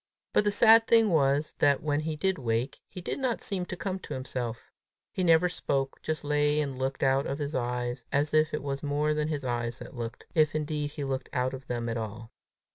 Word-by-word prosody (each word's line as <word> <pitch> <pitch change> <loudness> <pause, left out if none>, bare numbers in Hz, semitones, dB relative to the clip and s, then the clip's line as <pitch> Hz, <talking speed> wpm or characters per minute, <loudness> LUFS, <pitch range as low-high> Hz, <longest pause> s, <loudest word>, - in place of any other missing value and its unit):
But 210 - +4
the 205 - +3
sad 225 +2 +6
thing 225 -2 +5
was, 145 -2 +2
that, 140 +3 +3
when 145 -1 +1
he 155 0 -2
did 190 +4 0
wake, 115 +1 -1
he 180 - -8
did 175 - -3
not 255 -3 -1
seem 185 -3 -2
to - - -4
come 190 -1 -3
to - - -6
himself. 125 -3 -5 0.4
He 185 - -2
never 165 0 +5
spoke, 135 -6 -2
but - - -32
just 155 0 -3
lay 150 0 +2
and 140 -3 -2
looked 135 +1 -2
out 135 +1 +3
of 140 - -2
his 145 0 -3
eyes, 125 -1 -2
if 145 +2 +2
indeed 155 0 +5
it 150 - -3
was 140 -1 -3
more 150 +1 +1
than 150 0 0
his 150 -3 -3
eyes 120 -1 -2
that - - -10
looked, 115 -1 -6
if 155 -3 +3
indeed 150 -1 -1
he 145 0 -6
looked 135 -1 -3
out 125 +1 0
of 130 0 -8
them 120 -1 -2
at 115 0 -2
all! 110 0 -6
145 Hz, 230 wpm, -29 LUFS, 130-155 Hz, 0.4 s, sad